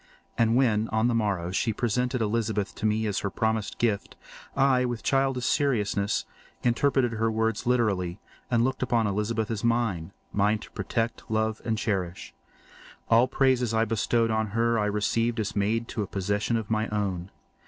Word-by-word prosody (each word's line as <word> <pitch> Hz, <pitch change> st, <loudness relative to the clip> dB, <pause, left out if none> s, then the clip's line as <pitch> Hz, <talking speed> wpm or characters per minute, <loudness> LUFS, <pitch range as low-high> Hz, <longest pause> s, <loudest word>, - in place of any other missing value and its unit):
And 115 Hz, 0 st, +3 dB
when, 115 Hz, -4 st, +3 dB
on 110 Hz, +2 st, +2 dB
the 120 Hz, -, +1 dB
morrow, 100 Hz, -6 st, 0 dB
she 110 Hz, +4 st, 0 dB
presented 125 Hz, +2 st, 0 dB
Elizabeth 110 Hz, -2 st, -1 dB
to 110 Hz, -, -1 dB
me 110 Hz, +1 st, +1 dB
as 105 Hz, -2 st, 0 dB
her 100 Hz, -, -2 dB
promised 110 Hz, +1 st, -1 dB
gift, 110 Hz, -4 st, -1 dB, 0.4 s
I, 135 Hz, -2 st, +3 dB
with 120 Hz, -2 st, -3 dB
childish 135 Hz, -2 st, +1 dB
seriousness, 105 Hz, -7 st, +1 dB, 0.4 s
interpreted 125 Hz, +1 st, +2 dB
her 115 Hz, 0 st, +1 dB
words 110 Hz, 0 st, -1 dB
literally 100 Hz, -7 st, +1 dB, 0.3 s
and 120 Hz, -1 st, +3 dB
looked 130 Hz, +2 st, -1 dB
upon 120 Hz, -3 st, +2 dB
Elizabeth 105 Hz, +2 st, -1 dB
as 110 Hz, -1 st, -3 dB
mine—mine 105 Hz, -2 st, 0 dB
to -, -, -12 dB
protect, 115 Hz, +3 st, -3 dB
love, 110 Hz, 0 st, 0 dB
and 110 Hz, -1 st, -1 dB
cherish. 95 Hz, -5 st, -3 dB, 0.8 s
All 115 Hz, +2 st, +6 dB
praises 130 Hz, -4 st, +2 dB
bestowed 115 Hz, +1 st, +1 dB
on 110 Hz, 0 st, +1 dB
her 115 Hz, 0 st, +2 dB
I 105 Hz, -, +1 dB
received 115 Hz, +3 st, 0 dB
as 105 Hz, -1 st, -2 dB
made 110 Hz, +3 st, 0 dB
to 110 Hz, -, -3 dB
a 100 Hz, -, -2 dB
possession 100 Hz, +4 st, -1 dB
of 110 Hz, -1 st, -5 dB
my 110 Hz, 0 st, +1 dB
own. 100 Hz, -4 st, -2 dB
110 Hz, 165 wpm, -27 LUFS, 105-120 Hz, 0.8 s, All